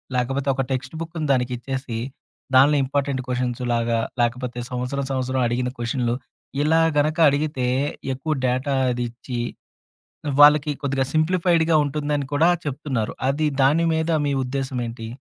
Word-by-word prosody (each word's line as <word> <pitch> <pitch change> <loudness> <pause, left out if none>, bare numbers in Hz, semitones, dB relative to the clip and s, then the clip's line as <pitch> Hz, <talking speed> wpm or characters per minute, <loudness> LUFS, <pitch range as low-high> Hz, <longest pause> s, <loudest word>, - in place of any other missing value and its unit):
లేకపోతే 135 +3 -1
ఒక 135 - 0
టెక్స్ట్ 130 +4 -3
బుక్కుని 165 -2 -4
దానికిచ్చేసి. 125 0 -2 0.6
దానిలో 140 +3 +6
ఇంపార్టెంట్ 140 -1 -1
క్వెషన్స్‌లాగా 120 -2 0 0.2
లేకపోతే 125 +1 -1
సంవత్సరం, 125 +3 -2
సంవత్సరం 130 0 -1
అడిగిన 125 +1 -1
క్వెషన్లు 120 0 -1 0.5
ఇలా 160 +2 +3 0.2
గనుక 155 +3 +2
అడిగితే 145 -2 -1 0.5
ఎక్కువ 135 +5 -4
డేటా 130 +3 0 0.2
అదిచ్చి, 120 0 -4 1.0
వాళ్ళకి 150 0 +7
కొద్దిగా 135 -1 0
సింప్లిఫైడ్‌గా 165 0 +2
ఉంటుందని 145 0 -2
కూడా 155 +4 +4 0.2
చెప్తున్నారు. 135 -6 -2 0.2
అది 150 +3 +1 0.2
దాని 150 +5 +4
మీద 160 +1 0 0.2
మీ 140 - +1
ఉద్దేశం 135 0 -3
ఏంటి? 115 -1 -7
135 Hz, 120 wpm, -23 LUFS, 125-150 Hz, 1.0 s, వాళ్ళకి